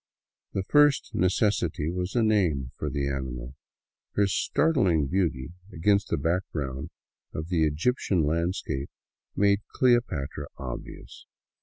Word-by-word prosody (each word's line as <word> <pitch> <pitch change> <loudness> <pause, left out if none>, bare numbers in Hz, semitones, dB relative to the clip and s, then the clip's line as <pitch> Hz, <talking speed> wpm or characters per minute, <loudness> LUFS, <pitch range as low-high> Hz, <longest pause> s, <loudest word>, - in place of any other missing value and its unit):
The 95 - -1
first 145 +5 +4
necessity 90 -4 +1
was 90 +3 -3
a 120 - +3
name 85 - +1
for - - -3
the 70 -1 -1
animal. 65 -2 -4 0.6
Her 100 - +3
startling 95 - +2
beauty 80 -4 -1 0.2
against 100 +4 +2
the - - +1
background 75 -4 -2 0.5
of 80 +2 -4
the 80 -3 +2
Egyptian 90 - +1
landscape 80 -3 -1 0.5
made 100 0 +3
" - - -34
Cleopatra 120 - +1
" - - -43
obvious. - - -9
85 Hz, 125 wpm, -27 LUFS, 70-100 Hz, 0.6 s, first